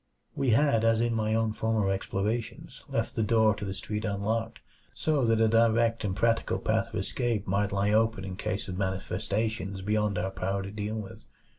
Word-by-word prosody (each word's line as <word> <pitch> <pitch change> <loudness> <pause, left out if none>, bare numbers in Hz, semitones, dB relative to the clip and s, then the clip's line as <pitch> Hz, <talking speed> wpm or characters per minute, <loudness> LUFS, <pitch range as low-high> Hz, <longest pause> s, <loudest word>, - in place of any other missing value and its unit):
We 135 -2 0
had, 115 -1 +3
as 115 0 +3
in 120 0 +1
my 110 -1 0
own 110 -1 +1
former 110 -3 0
explorations, 105 +4 -3
left - - -1
the - - -1
door 110 0 +4
to 100 - -7
the 95 -1 -4
street 105 +2 -4
unlocked; 110 +3 -1 0.4
so 150 -4 +1
that 115 -1 +3
a 115 - +5
direct 115 +1 +3
and 95 -3 -1
practical 115 +2 +1
path 110 +1 0
of 115 - -10
escape 115 +1 -1
might 100 +2 0
lie 100 +1 +1
open 110 -2 +2
in 95 -1 -5
case 105 +1 -3
of 90 0 -5
manifestations 100 +2 -2
beyond 105 -1 0
our 95 +2 -1
power 95 +1 -2
to 100 - -6
deal 105 +1 -3
with. 100 -3 -9
110 Hz, 190 wpm, -28 LUFS, 100-115 Hz, 0.4 s, a